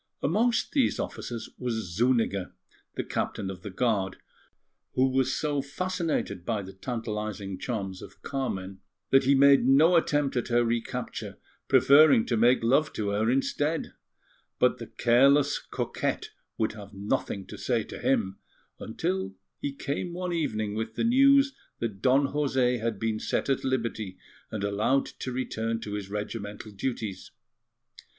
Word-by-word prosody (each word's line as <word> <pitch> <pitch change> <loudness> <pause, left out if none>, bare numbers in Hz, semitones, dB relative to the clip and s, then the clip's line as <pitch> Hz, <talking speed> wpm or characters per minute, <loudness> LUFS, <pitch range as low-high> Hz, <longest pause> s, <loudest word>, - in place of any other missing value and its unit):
Amongst 220 - +2
these 275 -4 +2
officers 120 -2 -5
was 110 -8 -3
Zuniga, 115 -5 +1 0.4
the - - -2
Captain 95 -1 -3
of 90 -2 -10
the 100 - -6
Guard, 100 -2 0 0.8
who 130 +1 +4
was 130 0 +1
so 145 -2 0
fascinated 165 - -2
by 105 0 -2
the 95 +1 -10
tantalizing 105 -3 -4
charms 95 -6 -4
of - - -13
Carmen 95 -9 -3 0.3
that 135 0 +5
he 140 +1 +5
made 140 -1 +6
no 155 +6 +6
attempt 145 -4 +2
at 120 - -1
her 120 0 +3
recapture, 120 +2 -3 0.3
preferring 140 -4 +6
to 120 - 0
make 120 +2 +4
love 135 +6 +3
to 105 -2 -2
her 105 +3 +1
instead; 145 +4 0 0.6
but - - +2
the - - -7
careless 135 +4 +4
coquette - - -3 0.3
would 110 - +1
have 100 -1 -11
nothing 100 -1 -2
to - - -9
say - - 0
to - - -9
him, 95 0 0 0.4
until 95 0 -3 0.2
he 145 - -2
came 140 +5 -4
one 180 0 -3
evening 110 -11 -1
with 110 +1 -4
the - - -1
news 275 +3 +5 0.2
that 105 -4 -4
Don 135 +3 +4
José 130 -5 +1
had 115 -2 -1
been 110 -1 -1
set - - -1
at 135 - +1
liberty 115 -7 -2 0.3
and 105 -2 -4
allowed 105 +7 +1
to 130 - -4
return 115 -3 -2
to 105 -2 -6
his 100 -2 -4
regimental 105 0 -5
duties. 105 -3 -4
120 Hz, 150 wpm, -28 LUFS, 105-140 Hz, 0.8 s, made